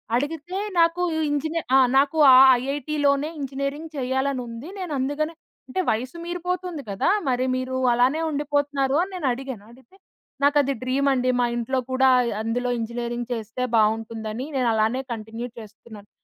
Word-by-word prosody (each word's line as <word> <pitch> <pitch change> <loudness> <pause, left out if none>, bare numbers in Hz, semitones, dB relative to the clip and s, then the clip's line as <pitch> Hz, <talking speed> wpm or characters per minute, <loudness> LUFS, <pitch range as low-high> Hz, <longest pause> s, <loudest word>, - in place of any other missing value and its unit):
అడిగితే, 315 +7 -3 0.2
నాకూ 335 +1 +3
ఈ - - -1
ఇంజినే 315 +3 -1 0.2
ఆ! - - +7 0.2
"నాకు 285 +3 +2 0.2
ఆ - - +9 0.2
ఐఐటీలోనే 285 +1 0
ఇంజినీరింగ్ 275 +3 -4
చెయ్యాలనుంది, 260 0 -2
నేనందుకనే" 305 -2 -2 0.3
అంటే, 260 - -3
వయసు 255 +9 -2
మీరిపోతుంది 355 -3 -4
కదా! 195 - 0 0.2
మరి 255 +1 +1
మీరు 255 0 -3 0.2
అలానే 255 +7 +2
ఉండిపోతున్నారు 285 -2 0
అని 390 - -7
నేనడిగాను. 260 - -3
అడిగితే, 260 +9 -20 0.5
"నాకది 285 -1 +3
డ్రీమండి, 260 -1 +1
మా 240 - +2
ఇంట్లో 255 +2 -1
కూడా 265 0 +4
అయ్ 235 - -1
అందులో 245 +2 -1
ఇంజినీరింగ్ 240 +1 -4
చేస్తే 225 +3 -4
బావుంటుందని 220 +3 0
నేనలానే 235 +1 +1
కంటిన్యూ 225 +2 -6
చేస్తున్నాను." 215 -1 -13
265 Hz, 130 wpm, -24 LUFS, 240-290 Hz, 0.5 s, ఆ